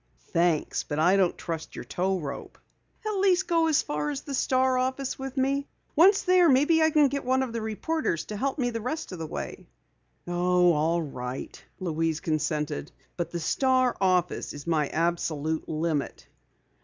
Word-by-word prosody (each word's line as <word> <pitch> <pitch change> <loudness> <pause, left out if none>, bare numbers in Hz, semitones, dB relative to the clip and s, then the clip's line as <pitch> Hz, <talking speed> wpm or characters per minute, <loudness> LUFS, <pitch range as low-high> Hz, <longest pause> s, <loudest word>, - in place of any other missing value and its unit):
"Thanks, 170 -2 +1
but 145 - -5
I 175 +5 +4
don't 190 -3 +2
trust 165 -1 -5
your - - -7
tow 190 +1 -1
rope." 140 -3 -7 0.5
"At 425 -2 -1
least 380 -1 +3
go 330 -2 +3
as 310 -3 +3
far 150 0 -2
as 140 -2 -3
the 280 - -7
Star 260 0 +2
office 260 +1 -2
with 270 0 -6
me. 275 +2 +1 0.3
Once 390 +6 +6
there, 365 -2 +5
maybe 295 +5 +4
I 315 - +5
can 300 -2 +4
get 280 +1 -3
one 260 +1 +2
of 245 -3 -5
the 230 - -2
reporters 220 - -2
to 210 - -6
help 270 +7 -1
me 245 -3 0
the 230 -1 -4
rest 255 +4 -4
of 180 - -7
the 160 - -4
way." - - -6 0.6
"Oh, 180 0 +3
all 165 +3 +1
right," 125 -3 -6 0.2
Louise 165 -3 -1
consented. 150 - -2 0.2
"But 170 -1 -3
the 170 - -4
Star 255 +8 +2
office 180 -2 +1
is 145 -1 -9
my 155 -3 +1
absolute 160 -2 -1
limit." 155 -2 -2
185 Hz, 180 wpm, -27 LUFS, -, 0.6 s, Once